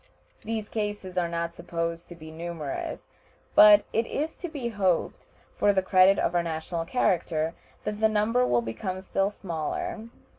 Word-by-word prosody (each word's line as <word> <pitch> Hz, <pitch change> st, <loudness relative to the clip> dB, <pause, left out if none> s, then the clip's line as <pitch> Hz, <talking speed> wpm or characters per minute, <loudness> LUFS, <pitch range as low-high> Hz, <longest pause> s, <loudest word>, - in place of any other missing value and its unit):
These 220 Hz, -1 st, -3 dB
cases 205 Hz, -4 st, -4 dB
are 175 Hz, -2 st, +1 dB
not 170 Hz, 0 st, -3 dB
supposed 170 Hz, 0 st, -4 dB
to 175 Hz, -, -9 dB
be 160 Hz, -1 st, -11 dB
numerous, 160 Hz, -3 st, -5 dB, 0.5 s
but 210 Hz, -1 st, +8 dB
it 225 Hz, +1 st, +1 dB
is 310 Hz, +3 st, -2 dB
to 350 Hz, -, -5 dB
be 275 Hz, -7 st, -4 dB
hoped, 190 Hz, -6 st, 0 dB, 0.3 s
for 205 Hz, -, +3 dB
the 190 Hz, -1 st, +1 dB
credit 190 Hz, +1 st, +5 dB
of 170 Hz, -, 0 dB
our 175 Hz, -, +3 dB
national 165 Hz, 0 st, -3 dB
character, 165 Hz, -6 st, 0 dB, 0.3 s
that 210 Hz, 0 st, -3 dB
the 220 Hz, 0 st, +4 dB
number 215 Hz, +4 st, +2 dB
will 120 Hz, -, +2 dB
become 185 Hz, -, -4 dB
still 195 Hz, +1 st, 0 dB
smaller. 190 Hz, +3 st, -4 dB
185 Hz, 160 wpm, -27 LUFS, 170-210 Hz, 0.5 s, but